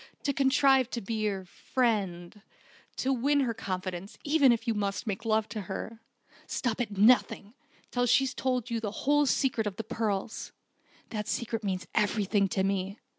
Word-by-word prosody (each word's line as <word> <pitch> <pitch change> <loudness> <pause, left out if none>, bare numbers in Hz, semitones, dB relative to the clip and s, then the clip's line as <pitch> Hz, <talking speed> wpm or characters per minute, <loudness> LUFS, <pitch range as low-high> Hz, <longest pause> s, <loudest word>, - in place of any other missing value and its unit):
"To 280 - +1
contrive 270 -2 +4
to 240 - -3
be 215 +2 -3
her 195 -2 -3
friend, 200 -4 -2 0.5
to 270 +1 0
win 280 +3 +2
her 240 -4 0
confidence 185 -3 -5
even 285 -3 +5
if 235 0 -1
you 230 - +2
must 200 +1 -2
make 205 0 -4
love 220 -1 +2
to 215 -1 -4
her. 220 +4 -5 0.5
Stop 245 -1 -1
at 205 -4 -4
nothing, 215 -1 +4 0.3
until 245 0 -1
she's 270 +1 +3
told 255 -2 -1
you 230 - 0
the 220 -2 -3 0.2
whole 290 +1 +4
secret 245 -5 +1
of 200 - -4
the 225 - -4
pearls. 220 -2 -3 0.6
That 210 -2 -3
secret 230 +1 -2
means 190 -2 -2
everything 205 -1 +2
to 190 0 0
me. 195 +1 -1
220 Hz, 170 wpm, -29 LUFS, 200-250 Hz, 0.6 s, even